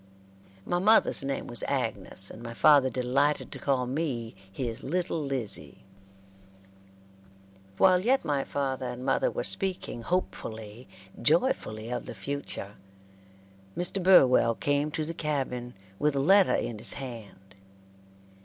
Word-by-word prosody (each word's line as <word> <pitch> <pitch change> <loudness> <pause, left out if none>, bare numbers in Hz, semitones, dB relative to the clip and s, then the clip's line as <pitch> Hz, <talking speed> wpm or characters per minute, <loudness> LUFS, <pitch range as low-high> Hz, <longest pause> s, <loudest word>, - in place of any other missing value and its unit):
My 175 - 0
mother's 215 -6 +4
name 135 0 -3
was 120 - -1
Agnes, 95 +1 -3
and 110 - -11
my 115 0 -8
father 145 -2 +5
delighted 130 +4 0
to - - -6
call 130 -3 0
me 125 -4 -3 0.2
his 115 +2 -4
"Little 170 0 -2
Lizzie." 130 -7 -3 1.9
While 185 - +5
yet 245 +3 +1
my 145 -3 0
father 135 -2 -3
and 125 +1 -6
mother - - +2
were - - -4
speaking 180 - +1
hopefully, 115 - -4 0.3
joyfully 120 - +1
of 125 - -4
the - - -7
future, 105 -3 -5 1.0
Mr. 180 +2 +1
Burwell 130 -10 +5
came 145 +3 0
to 155 0 -3
the 165 - -5
cabin, 130 -7 -3 0.2
with 150 -1 +1
a - - +1
letter 190 +7 +5
in 110 -3 -3
his - - -1
hand. 110 -7 -9
135 Hz, 130 wpm, -28 LUFS, 120-155 Hz, 1.9 s, father